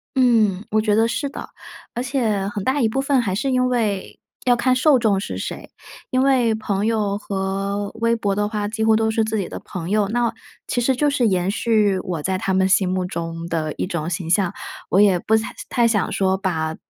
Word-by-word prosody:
嗯， 220 -6 +3
我 215 - +2
觉 215 -1 +1
得 225 +1 +3
是 280 +4 -2
的。 - - -8 0.5
而 245 - -2
且， 225 -7 0
很 205 -2 -5
大 265 +2 +1
一 225 - +3
部 270 +5 -1
分 275 -2 +2
还 190 -5 -2
是 270 +7 -1
因 255 0 +2
为， 215 -6 -2 0.3
要 245 -1 +5
看 255 +1 +2
受 265 0 +4
众 205 -4 +2
是 - - -5
谁， - - -6 0.4
因 255 0 +2
为 255 -4 +3
朋 210 -2 -2
友 210 -3 0
和 195 0 -3
微 230 +1 +1
博 200 -3 -1
的 205 0 0
话 210 -1 -2
几 220 +1 -3
乎 220 0 +4
都 220 0 +1
是 220 0 +1
自 220 0 -1
己 190 - -3
的 - - -6
朋 175 -2 -7
友， 210 0 +2
那 240 0 +1 0.4
其 245 - 0
实 260 +2 +2
就 290 +3 +2
是 255 -5 +2
延 185 -1 +1
续 210 -2 +2
我 175 -4 -4
在 185 +3 -1
他 190 - -1
们 190 0 +3
心 190 0 +3
目 185 0 -1
中 165 -1 -5
的 155 -2 -2
一 - - -3
种 170 -4 -3
形 170 -1 -4
象， 180 0 +2 0.4
我 195 - +4
也 195 -3 +5
不 220 +5 +1
太 220 0 -1 0.2
太 235 -1 +3
想 210 -4 0
说 190 -1 +1
把， 160 -5 -2
210 Hz, 240 characters per minute, -21 LUFS, 190-235 Hz, 0.5 s, 要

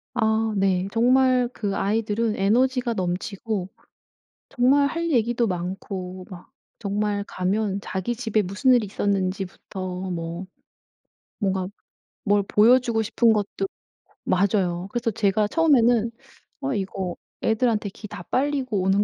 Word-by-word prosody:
아 220 -1 +1
네 190 -1 +1
정말 250 +2 +3
그 200 -3 -2
아이들은 215 +2 0
에너지가 245 +4 +2
넘치고 190 +1 -3 0.8
정말 275 +3 +4
할 335 +2 -2
얘기도 240 -2 +2
많고 185 0 -5
막 180 -3 -11 0.3
정말 205 0 -1
가면 195 +2 -1
자기 195 +5 -3
집에 220 -3 0
무슨 200 +8 +1
일이 240 -3 +3
있었는지부터 190 -1 -3
뭐 170 +1 -4 0.9
뭔가 190 -2 -1 0.6
뭘 205 -1 +3
보여주고 230 +2 +4
싶은 230 +2 +3
것도 200 -2 -1 0.6
맞아요. 185 -2 +1
그래서 240 -1 -1
제가 210 0 +1
처음에는 240 -6 +3 0.5
'어 275 -1 -1
이거 190 -2 -3 0.3
애들한테 220 -2 +1
기 210 +2 -10
다 210 -3 -8
빨리고 260 -4 0
오는 195 +2 +3
210 Hz, 255 characters per minute, -24 LUFS, 190-235 Hz, 0.9 s, 정말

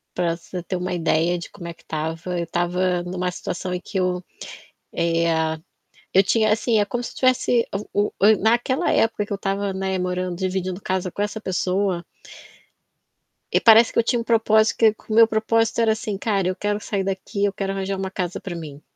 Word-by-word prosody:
Pra 170 -2 0
você 180 +1 -7
ter 180 +2 -4
uma 180 0 -3
ideia 170 0 +1
de - - -8
como 170 -4 -10
é 170 - -6
que - - -25
tava, 165 +3 -3
eu 170 - -2
tava 175 +1 0
numa 180 0 -3
situação 180 +1 -4
em 180 - -3
que 195 -1 -4
eu, 180 0 0 0.7
eh, 170 0 +1 0.9
eu 190 - +7
tinha, 215 +2 +2
assim, 225 0 +1
é 205 - +2
como 245 +4 -3
se - - -7
tivesse 250 -2 +2 0.3
o 205 0 +1
o 205 - +5
naquela 240 +5 +2
época 225 -2 +1
que 205 - -5
eu 200 - -2
tava, 195 0 -1
né, 190 0 -2
morando, 180 -1 -2
dividindo 185 -1 -2
casa 185 -1 -2
com 200 - -5
essa 210 +1 -2
pessoa 185 -1 -1 1.5
E - - +3
parece 225 +1 +8
que - - +1
eu - - +4
tinha 240 +1 +1
um - - -3
propósito, 220 -1 +3
que 220 -2 +4
o - - -1
meu 225 0 +7
propósito 225 +1 +1
era 225 -1 +4
assim: 215 -2 -4
"Cara, 195 -3 0
eu 185 - -1
quero 205 0 -1
sair 200 -2 -2
daqui, 195 +2 -3
eu 200 - +1
quero 195 -1 -3
arranjar 195 0 -3
uma 190 0 -4
casa 180 -2 -3
para 180 -3 -6
mim". 150 -3 -8
190 Hz, 205 wpm, -22 LUFS, 180-215 Hz, 1.5 s, parece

